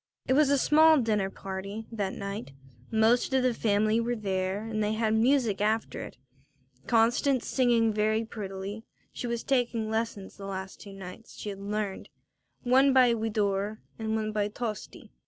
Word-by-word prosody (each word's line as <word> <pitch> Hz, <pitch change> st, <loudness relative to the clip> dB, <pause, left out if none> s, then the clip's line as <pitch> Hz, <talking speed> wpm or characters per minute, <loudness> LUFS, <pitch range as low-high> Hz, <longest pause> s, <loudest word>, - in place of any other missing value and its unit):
It -, -, +3 dB
was 290 Hz, +1 st, +4 dB
a 280 Hz, -, +4 dB
small 315 Hz, +3 st, +6 dB
dinner 210 Hz, -5 st, +1 dB
party 195 Hz, +3 st, -6 dB
that 200 Hz, -4 st, -2 dB
night; 200 Hz, -6 st, -6 dB, 0.4 s
most 230 Hz, +4 st, +3 dB
of 260 Hz, -, +3 dB
the 255 Hz, -1 st, +2 dB
family 215 Hz, 0 st, +2 dB
were 240 Hz, +1 st, -1 dB
there 195 Hz, -1 st, -2 dB
and 215 Hz, -1 st, -2 dB
they 210 Hz, +1 st, 0 dB
had 220 Hz, 0 st, +1 dB
music 230 Hz, -2 st, +2 dB
after 220 Hz, +2 st, 0 dB
it, -, -, -9 dB, 0.7 s
Constance 240 Hz, +3 st, +2 dB
singing 235 Hz, -4 st, +2 dB
very 215 Hz, +1 st, +1 dB
prettily 200 Hz, 0 st, -6 dB, 0.3 s
she 245 Hz, -, -4 dB
was 235 Hz, -1 st, -2 dB
taking 235 Hz, -4 st, 0 dB
lessons 220 Hz, -3 st, -3 dB
the 200 Hz, -1 st, -7 dB
last 190 Hz, 0 st, -6 dB
two 195 Hz, -1 st, -10 dB
songs 190 Hz, +4 st, -10 dB
she 210 Hz, -, -5 dB
had 195 Hz, -1 st, -6 dB
learned, 205 Hz, -1 st, -4 dB, 0.5 s
one 265 Hz, +2 st, +4 dB
by 250 Hz, -2 st, +6 dB
Widor 210 Hz, -2 st, -1 dB, 0.2 s
and 220 Hz, 0 st, -1 dB
one 215 Hz, -1 st, -1 dB
by 210 Hz, -1 st, 0 dB
Tosti. 215 Hz, +1 st, -6 dB
220 Hz, 165 wpm, -28 LUFS, 205-235 Hz, 0.7 s, small